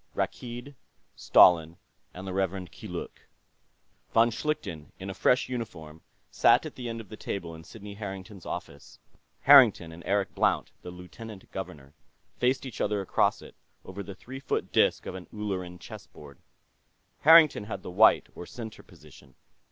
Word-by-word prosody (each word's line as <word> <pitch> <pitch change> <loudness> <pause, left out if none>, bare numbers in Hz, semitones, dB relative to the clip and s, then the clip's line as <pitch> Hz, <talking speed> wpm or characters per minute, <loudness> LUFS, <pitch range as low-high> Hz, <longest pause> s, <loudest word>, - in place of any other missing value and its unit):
Rakkeed, 120 +3 -4 0.4
Stalin, 85 -2 +5 0.3
and 90 +1 -9
the 95 - -5
Rev. 95 -1 -2
Keeluk - - -8 0.9
Von 115 +1 +5
Schlichten, 100 - -4
in 95 +1 -6
a - - -6
fresh 125 +6 +2
uniform, 80 -11 -7 0.3
sat - - +4
at - - -7
the 120 -2 -6
end 115 0 -5
of 105 - -15
the - - -8
table 90 -5 -5
in 80 0 -11
Sidney 105 +3 -10
Harrington's 100 -1 -8
office; 70 0 -8 0.4
Harrington 125 -12 +7
and 85 +1 -11
Eric 100 0 0
Blount, - - +1
the - - -8
Lieutenant 95 +4 -11
Governor, 75 -7 -8 0.4
faced 130 +2 0
each 130 - -6
other 105 0 0
across 95 - +1
it, - - -13 0.3
over 95 +2 -7
the 100 0 -8
three 130 +7 -9
foot - - -3
disc - - +2
of - - -5
an 95 -1 -9
Ulleran 95 -4 -4
chess 85 - -11
board. 70 -3 -14 0.8
Harrington 155 -8 +7
had 110 - -6
the - - -7
white, 105 +5 +5
or 90 - -9
center, 115 -3 -9
position. 65 -1 -18
95 Hz, 160 wpm, -28 LUFS, 90-115 Hz, 0.9 s, Harrington